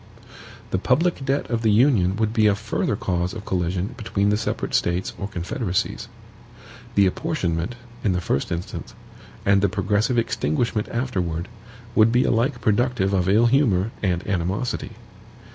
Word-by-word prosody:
The 95 - +1
public 145 - +1
debt 135 +1 0
of 115 -1 0
the 110 - +2
Union 105 -5 +4
would 110 0 0
be 110 -2 +4
a 100 - +3
further 105 0 -1
cause 90 0 -2
of 110 -1 -7
collision 90 +1 -1
between 100 -2 0
the 105 - +3
separate 110 - -3
States 85 +2 0
or 100 - -3
confederacies. 90 +1 -2 0.9
The 100 - +5
apportionment, 95 - -1 0.3
in 100 - +2
the 90 - 0
first 70 -4 -1
instance, 85 +1 -5 0.5
and 100 0 +4
the 100 - +3
progressive 105 +5 0
extinguishment 110 0 0
afterward, 90 -9 -2 0.4
would 110 0 +5
be 125 +2 +3
alike 120 +2 +1
productive 110 -2 +1
of 95 -1 +1
ill 110 +4 +5
humor 115 -6 +3
and 90 -3 0
animosity. 95 +5 -2
105 Hz, 150 wpm, -23 LUFS, 90-115 Hz, 0.9 s, The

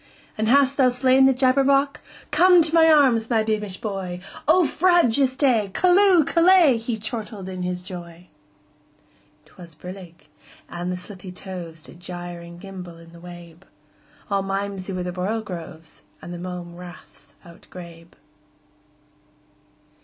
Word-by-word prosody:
"And 220 0 -2
hast 275 +2 +3
thou 260 -3 +4
slain 260 +1 +3
the - - +5
Jabberwock? 275 +2 +2 0.3
Come 350 +3 +5
to 320 0 0
my 325 -1 +6
arms, 255 -7 +3
my 225 -3 +2
beamish 210 -3 -3
boy!O 195 - -1
frabjous 285 -7 +2
day! 245 -8 +2
Callooh! 365 -2 +4
Callay!"He 315 -11 +3
chortled 215 -2 -5
in 185 -1 -6
his 180 0 -3
joy.'T 175 +2 -16
was 170 -3 -12
brillig, 175 0 -11 0.4
and 175 +1 -5
the 180 - -3
slithy 185 0 -10
tovesDid 170 -3 -9
gyre 175 -1 -7
and 170 0 -12
gimble 180 -3 -10
in 165 0 -16
the 170 - -14
wabe; 175 -1 -12 0.7
All 200 0 +1
mimsy 195 0 -4
were 185 -1 -3
the 180 - -4
borogoves, 180 -4 -6 0.2
And 175 - -9
the 175 - -7
mome 175 -1 -7
raths 180 -1 -14
outgrabe. 170 0 -13
195 Hz, 130 wpm, -22 LUFS, 175-260 Hz, 0.7 s, my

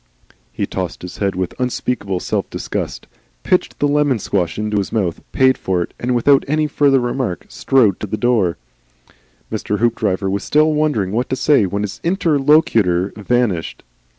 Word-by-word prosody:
He - - -2
tossed 90 -3 -5
his 90 - -8
head 100 -1 0
with 90 -1 -2
unspeakable 125 -6 -2
self - - -2
disgust, - - -4 0.4
pitched - - 0
the 145 - +1
lemon 145 -3 +2
squash 90 -5 -2
into 105 0 -1
his 100 - -2
mouth, 95 -7 -1
paid 130 0 +3
for 90 -2 0
it, - - -11
and 125 +1 -1
without 135 +3 +4
any 155 +2 +1
further 140 -2 +3
remark 120 -6 -2
strode 115 -8 +2
to 105 - -4
the 110 - -3
door. 110 -8 +1 0.9
Mr. 105 -1 -2
Hoopdriver 105 -4 0
was 100 +1 -2
still 155 +1 +3
wondering 150 -11 0
what 120 +4 -1
to - - 0
say 130 -6 +3
when 100 +2 -2
his 105 - -5
interlocutor 145 - +2
vanished. 105 -5 -1
115 Hz, 165 wpm, -18 LUFS, 95-135 Hz, 0.9 s, without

